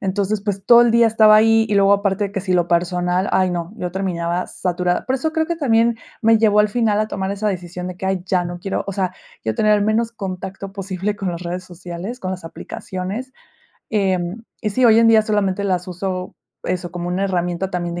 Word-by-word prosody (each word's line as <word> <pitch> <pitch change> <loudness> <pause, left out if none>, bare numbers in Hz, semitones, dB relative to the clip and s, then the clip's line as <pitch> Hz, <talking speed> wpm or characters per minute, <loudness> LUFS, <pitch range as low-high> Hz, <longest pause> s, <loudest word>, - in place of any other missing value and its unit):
Entonces, 200 +1 -1
pues 200 -2 -3
todo 240 0 +8
el 240 - +3
día 235 0 +5
estaba 215 -1 +6
ahí 225 +1 +5
y 210 - 0
luego 200 0 +5
aparte 200 0 +1
de 200 - -5
que 195 - -2
si 185 0 -2
lo 175 -1 +2
personal, 180 +2 0
ay 185 -1 +2
no, 175 +2 -4
yo 180 -5 -4
terminaba 180 -2 -2
saturada. 180 -1 -1
Por 260 - +1
eso 310 +4 -1
creo 320 -1 0
que 340 - -1
también 230 -5 +2 0.2
me 225 0 +5
llevó 210 -1 +3
al 210 0 +5
final 215 -2 +1
a 215 - +1
tomar 190 0 -3
esa 205 +1 -1
decisión 180 -1 -5
de 180 -1 -6
que: 190 - -4
"Ay, 190 -2 -1
ya 180 -1 +1
no 175 0 -5
quiero", 195 +2 -3
o - - -2
sea, 185 -1 -2 0.3
yo 110 - -1
tener 215 - +3
el 205 - 0
menos 225 +2 +1
contacto 195 -2 -6
posible 195 +1 -3
con 195 -3 -3
las 170 0 -6
redes 180 +1 -4
sociales, 180 +6 -7
con 185 -3 -4
las 185 -2 -7
aplicaciones. 195 +9 -6 0.6
Em, 190 -1 0 0.2
y 210 - 0
sí, 255 +5 +1
hoy 225 0 +6
en 230 - +5
día 220 -1 +6
solamente 205 -2 0
las 185 -2 -1
uso, 185 0 -4 0.3
eso, 180 -1 -2
como 175 0 -5
una 185 +2 -1
herramienta 180 0 -1
también 175 -1 -3
de 175 - -4
195 Hz, 230 wpm, -20 LUFS, 180-215 Hz, 0.6 s, todo